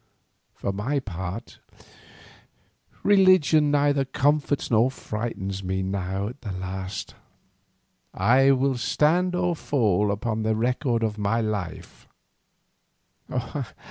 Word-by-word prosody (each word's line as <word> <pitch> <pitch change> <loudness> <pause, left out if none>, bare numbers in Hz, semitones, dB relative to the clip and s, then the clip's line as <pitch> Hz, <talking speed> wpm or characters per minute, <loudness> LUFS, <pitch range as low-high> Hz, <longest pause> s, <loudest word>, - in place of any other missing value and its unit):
For 100 - -3
my 110 +9 -1
part 95 -2 -6 1.4
religion 185 -7 +5
neither 145 -1 +2
comforts 145 +2 0
nor 115 +3 +4
frightens 105 -6 -5
me 95 +1 -2
now 95 +1 -2
at 125 +4 -12
the 105 - -5
last. 95 +1 -5 1.0
I 125 +8 +4
will 135 -1 +2
stand 170 +9 +2
or 180 -1 0
fall 105 - +1
upon 110 +2 -2
the 110 0 +1
record 120 +1 0
of 110 -1 -2
my 105 +3 +1
life. 105 -7 -5
115 Hz, 105 wpm, -25 LUFS, 100-140 Hz, 1.4 s, religion